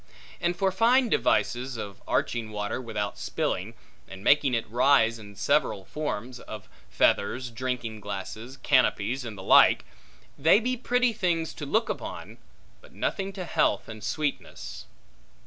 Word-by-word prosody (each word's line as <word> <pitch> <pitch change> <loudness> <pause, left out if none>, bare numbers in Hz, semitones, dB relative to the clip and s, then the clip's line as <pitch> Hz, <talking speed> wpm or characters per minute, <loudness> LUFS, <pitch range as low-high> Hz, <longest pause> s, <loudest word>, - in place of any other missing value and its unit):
And 175 0 0
for 190 +2 +1
fine 235 +6 +4
devices, 125 - +1
of 100 -3 -7
arching 115 -2 0
water 105 +3 -3
without 105 -4 -4
spilling, - - -2 0.3
and 95 0 -10
making 140 -1 +4
it 115 - -2
rise 115 -1 +3
in 105 -1 -12
several 95 0 +1
forms 125 -4 -4
(of - - -9 0.2
feathers, 120 - +1
drinking 120 -2 -3
glasses, 105 +5 -6
canopies, 130 -2 +2
and 110 -4 -7
the 95 - -8
like), - - +6 0.5
they 160 +8 +6
be 250 +3 -1
pretty 250 0 +1
things 175 -6 -1
to 145 - -7
look 220 +9 +1
on, - - -8 0.4
but - - -18
nothing 195 0 -2
to 185 -2 -5
health - - +1
and 110 -1 -9
sweetness. 145 +6 -4
125 Hz, 145 wpm, -27 LUFS, 110-170 Hz, 0.5 s, like